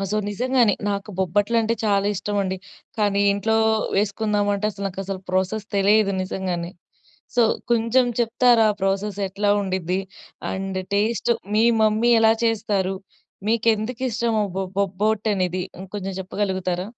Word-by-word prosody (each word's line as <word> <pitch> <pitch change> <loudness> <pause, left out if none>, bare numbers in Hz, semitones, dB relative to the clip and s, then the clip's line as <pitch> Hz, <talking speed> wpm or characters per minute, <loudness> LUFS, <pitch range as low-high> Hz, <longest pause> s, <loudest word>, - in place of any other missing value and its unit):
ఆ! 195 - -1
సో, - - +1
నిజంగానే 245 0 +2 0.2
నాకు 200 +1 -4
బొబ్బట్లంటే 220 +5 +1
చాలా 200 -1 +2
ఇష్టమండి. 195 -2 -2 0.4
కానీ 200 -1 +2
ఇంట్లో 220 +2 0 0.4
వేసుకుందామంటే 205 0 0
అసలు 200 0 -4
నాకసలు 195 0 -6
ప్రాసెస్ 190 +3 -1
తెలిదు 200 0 +3
నిజంగానే. 180 -2 -3 0.7
సో, 240 - +6 0.3
కొంచెం 235 +2 +3
చెప్తారా 235 -1 +4
ఆ - - -11
ప్రాసెస్ 195 +1 -1
ఎట్లా 205 +2 0
ఉండిద్ది? 185 -1 -1 0.5
అండ్ 190 0 -3 0.2
టేస్ట్ 220 +2 +1 0.2
మీ 220 - +4 0.2
మమ్మీ 220 +2 +3
ఎలా 220 0 +6
చేస్తారు? 205 -4 0 0.5
మీకేందుకిష్టము 230 +1 0 0.2
బొ 195 - -1
బొబ్బట్టనేది 200 -2 0 0.2
ఉంకొంచెం 195 0 -5
చెప్పగలుగుతారా? 185 -2 -2
205 Hz, 115 wpm, -23 LUFS, 190-220 Hz, 0.7 s, సో